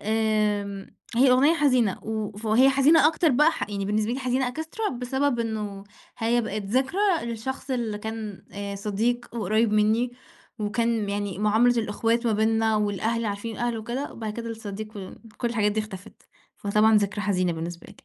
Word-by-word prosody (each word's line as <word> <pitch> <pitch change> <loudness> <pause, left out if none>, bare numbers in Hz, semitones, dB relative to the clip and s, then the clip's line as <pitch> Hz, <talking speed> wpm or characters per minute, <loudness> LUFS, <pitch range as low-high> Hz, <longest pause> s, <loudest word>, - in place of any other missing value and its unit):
آمم، 210 -2 -1 0.2
هي 260 +1 +6
أغنية 280 +6 +5
حزينة 255 - +2
و 215 -1 -3
وهي 245 +5 +5
حزينة 285 +3 +5
أكتر 325 0 +2
بقى 300 +6 +5
ح 210 - -4
يعني 200 -1 -3
بالنسبة 215 +3 0
لي 260 - -2
حزينة 255 -1 0
Extra 365 +6 -3
بسبب 250 +1 -1
إنّه، 210 -3 -4 0.3
هي 235 +2 +2
بقِت 215 -2 -3
ذكرى 260 - 0 0.2
لشخص 235 +4 -5
اللي 230 -5 -2
كان 220 -2 -6
آآ، 200 0 -5
صديق 220 +5 -1
وقريب 220 +1 +1
مِنّي، 220 +3 +2 0.5
وكان 220 0 0
يعني 200 -1 -3
معاملة 225 +4 +3
الإخوات 230 +3 0
ما 225 - +3
بيننا 220 +1 +2
والأهل 215 +3 0
عارفين 205 +2 -4
الأهل 240 -1 -1
وكده، 240 +6 -4
وبعد 220 -2 -5
كده 230 +1 -5
الصديق 215 -1 -7
و 190 -2 -7 0.3
كُلّ 240 - 0
الحاجات 215 -3 +1
دي 215 - 0
اختفت، 200 -3 -10 0.3
فطبعًا 210 +2 +3
ذكرى 205 0 0
حزينة 185 -4 +1
بالنسبة 170 +1 -6
لي. - - -14
220 Hz, 165 wpm, -25 LUFS, 210-245 Hz, 0.5 s, هي